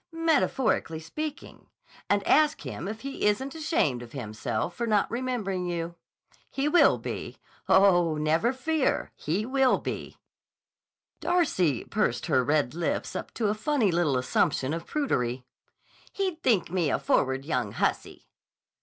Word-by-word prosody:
"—metaphorically 295 - +1
speaking, 300 - -7 0.4
and 205 -1 +2
ask 305 0 +3
him 175 - -6
if 220 +2 -6
he 275 -5 -2
isn't 265 +7 0
ashamed 300 - 0
of 120 -1 -11
himself 110 +3 -3
for 235 +6 -3
not 210 -2 +3
remembering 230 -7 -2
you. 170 -1 -3 0.6
He 275 +2 -1
will 345 +4 +5
be. - - -6 0.3
Oh, 175 -5 +5
never 160 +10 +2
fear 270 +2 0
he 185 +8 -2
will 265 0 +3
be!" - - -6 1.0
Darcy 185 - +1
pursed 210 -6 -1
her 135 -6 +2
red 145 -1 +1
lips 170 0 -2
up - - -5
to 220 -3 0
a - - +2
funny 220 -2 +1
little 165 -6 +1
assumption 130 +2 +1
of 165 0 -5
prudery. 125 - -1 0.7
"He'd 375 -5 -2
think 200 -9 +2
me 175 -5 +1
a - - +1
forward 130 0 +1
young 125 -9 -1
hussy." - - -2
195 Hz, 140 wpm, -27 LUFS, -, 1.0 s, will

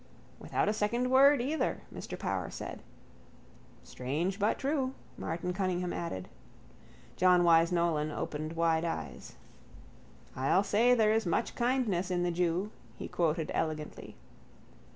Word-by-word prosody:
—Without - - -1
a 210 - +2
second 235 +4 0
word 270 0 +6
either, 300 +5 -1
Mr - - -7
Power - - -2
said. - - -7 1.0
—Strange 160 +10 -3
but 205 +2 +2
true, 270 -2 -1 0.2
Martin 180 +2 -3
Cunningham 180 -2 -1
added. 95 - -4 0.9
John 180 -1 +5
Wyse 165 0 +5
Nolan 170 -3 +1
opened 155 +1 -4
wide 165 -1 +2
eyes. 80 - -5 1.0
—I'll 135 +9 +2
say 230 +5 +4
there 215 -2 +4
is 220 -3 +1
much 230 - 0
kindness 235 -8 0
in 175 -1 0
the 175 - +1
jew, 180 +4 0 0.3
he - - -6
quoted, 165 -2 0
elegantly. 155 -1 -4
180 Hz, 130 wpm, -31 LUFS, 165-220 Hz, 1.0 s, word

